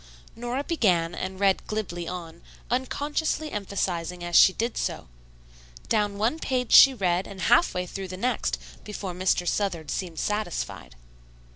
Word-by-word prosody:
Nora 245 +4 -3
began 180 - +1
and 185 +1 -5
read 195 -1 +2
glibly 180 -6 -4
on, 170 -2 -7 0.3
unconsciously 295 +4 -1
emphasizing 180 -4 -3
as 175 0 -3
she - - +8
did 230 +5 -2
so. - - -3 0.8
Down 205 -1 +1
one 230 +10 0
page 255 -5 -1
she 275 - +10
read 185 -3 0
and 195 -2 -9
half 240 - +4
way 180 0 -1
through 190 +2 -6
the 185 0 -7
next 250 +6 -1 0.3
before 200 -3 -5
Mr. 180 0 0
Southard 170 -8 -1
seemed 175 -4 -4
satisfied. 210 - -3
195 Hz, 145 wpm, -26 LUFS, 175-235 Hz, 0.8 s, she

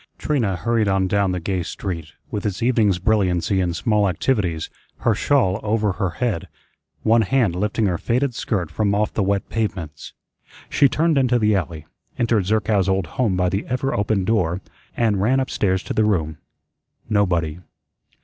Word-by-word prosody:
Trina 120 -11 0
hurried 115 +4 0
on 95 -1 +2
down 100 0 +1
the 90 - -2
gay 90 +2 -2
street, 85 -3 -5 0.2
with 105 - -3
its 100 0 -2
evening's 110 -6 +3
brilliancy 95 -2 +1
and 90 -2 -1
small 105 -1 +2
activities, 90 -4 -1 0.3
her 115 - +3
shawl 110 -4 +2
over 105 -1 +1
her 95 0 -1
head, 115 -9 -1 0.6
one 115 +1 +4
hand 110 -4 +1
lifting 105 +4 0
her 90 -4 0
faded 125 +2 0
skirt 95 -8 -2
from 100 -2 0
off 105 +1 0
the - - 0
wet 100 0 0
pavements. 90 -9 -4 0.6
She 140 -2 +4
turned 160 0 +2
into 125 -2 +3
the 105 -2 +2
alley, 80 -4 -3 0.3
entered 115 -5 +1
Zerkow's 105 -2 +1
old 95 -1 +1
home 95 +3 -1
by 90 0 +2
the 95 +3 -1
ever 130 +2 -1
open 100 -1 0
door, 90 -5 +1 0.4
and 105 -5 +2
ran 125 +6 +3
up 130 - -2
stairs 95 -2 0
to - - -4
the 110 - +2
room. 80 -7 0 0.7
Nobody. 90 -6 +1
100 Hz, 170 wpm, -21 LUFS, 90-115 Hz, 0.7 s, one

